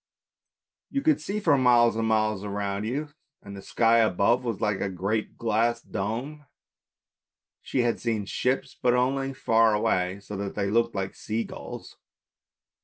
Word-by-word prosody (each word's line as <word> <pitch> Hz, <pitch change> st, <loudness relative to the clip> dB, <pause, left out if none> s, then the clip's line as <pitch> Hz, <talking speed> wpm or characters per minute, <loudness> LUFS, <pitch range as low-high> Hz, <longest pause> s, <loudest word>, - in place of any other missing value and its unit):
You 275 Hz, 0 st, -2 dB
could 310 Hz, -1 st, +3 dB
see 205 Hz, +2 st, -3 dB
for 165 Hz, -8 st, +3 dB
miles 120 Hz, -2 st, +5 dB
and 115 Hz, 0 st, 0 dB
miles 110 Hz, -2 st, +1 dB
around 100 Hz, 0 st, -3 dB
you, 145 Hz, +6 st, -3 dB, 0.3 s
and 100 Hz, 0 st, -9 dB
the 100 Hz, -, -8 dB
sky 115 Hz, +3 st, +3 dB
above 115 Hz, +3 st, +2 dB
was 115 Hz, -5 st, -3 dB
like 105 Hz, -2 st, 0 dB
a 100 Hz, -, -1 dB
great 100 Hz, +4 st, -2 dB
glass 115 Hz, +1 st, +1 dB
dome. 125 Hz, +9 st, -5 dB, 1.1 s
She 130 Hz, -, -1 dB
had 120 Hz, -1 st, 0 dB
seen 110 Hz, -4 st, -1 dB
ships, 125 Hz, +6 st, -1 dB
but 125 Hz, 0 st, +3 dB
only 135 Hz, +2 st, 0 dB
far 115 Hz, -4 st, +3 dB
away, 95 Hz, -2 st, 0 dB
so 100 Hz, +1 st, -8 dB
that 100 Hz, 0 st, -4 dB
they 100 Hz, 0 st, -1 dB
looked 115 Hz, 0 st, +1 dB
like 95 Hz, -1 st, -3 dB
sea 110 Hz, +1 st, -3 dB
gulls. -, -, -9 dB
115 Hz, 160 wpm, -26 LUFS, 100-125 Hz, 1.1 s, miles